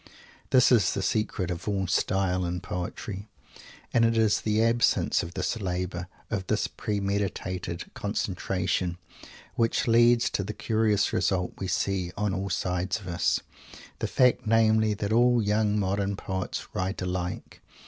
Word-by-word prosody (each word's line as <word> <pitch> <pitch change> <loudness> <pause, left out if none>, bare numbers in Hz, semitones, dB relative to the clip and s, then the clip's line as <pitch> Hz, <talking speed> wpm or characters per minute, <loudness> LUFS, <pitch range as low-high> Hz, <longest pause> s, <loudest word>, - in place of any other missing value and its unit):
This 130 -1 +5
is 105 -7 +4
the 100 - -1
secret 95 -5 -1
of 85 +3 -5
all 100 -2 0
"style" 90 0 +1
in 90 0 -2
poetry. 95 +4 -5 0.7
And 115 - +4
it 115 0 +3
is 110 -2 +3
the 110 +1 +2
absence 115 +1 +2
of 85 +2 -7
this 95 +4 -2
labour, 90 -1 -3 0.2
of 95 -5 -2
this - - +1
premeditated 100 -4 -3
concentration, 90 -1 -2 0.6
which 115 +1 +1
leads 120 +1 +4
to 100 - -1
the 105 +3 -5
curious 110 -1 +1
result 90 -2 0
we 95 - -3
see 95 0 -1
on 105 -1 0
all 95 +1 -2
sides 90 0 -1
of 95 - -11
us, 85 0 +1 0.6
the - - -1
fact, 125 -3 +3
namely, 110 -1 +3
that 105 +1 -2
all 120 +1 +4
young 105 0 +1
modern 100 0 0
poets 95 -1 -4
_write 95 +1 -2
alike. 90 0 -4
100 Hz, 150 wpm, -27 LUFS, 90-110 Hz, 0.7 s, This